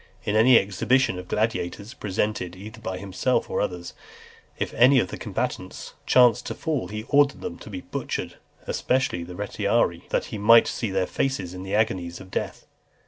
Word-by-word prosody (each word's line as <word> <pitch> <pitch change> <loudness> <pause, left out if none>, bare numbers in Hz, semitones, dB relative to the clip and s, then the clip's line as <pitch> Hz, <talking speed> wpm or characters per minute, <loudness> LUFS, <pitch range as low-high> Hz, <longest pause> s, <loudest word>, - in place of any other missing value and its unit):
In 105 - 0
any 115 +3 +7
exhibition 110 +2 +1
of 90 - -9
gladiators, 105 0 -2
presented 100 -5 -2
either 105 +4 -10
by 95 - -4
himself 95 0 -1
or - - 0
others, 90 -1 -4 0.6
if - - -3
any 130 +4 +6
of 95 - 0
the - - -5
combatants - - -4
chanced 125 -4 +5
to - - -4
fall, 150 - -2
he 105 +3 -5
ordered 145 0 +3
them 85 - -6
to - - -11
be 95 -3 -6
butchered, - - -5 0.3
especially 125 -9 0
the 90 +1 -9
Retiarii, 100 -3 0
that - - 0
he 105 - -3
might 115 +3 +7
see 115 - -3
their 95 -1 0
faces 95 -6 -2
in 90 - -7
the 95 +2 -3
agonies 90 -5 0
of 95 -1 -13
death. - - -4
105 Hz, 180 wpm, -25 LUFS, 90-115 Hz, 0.6 s, any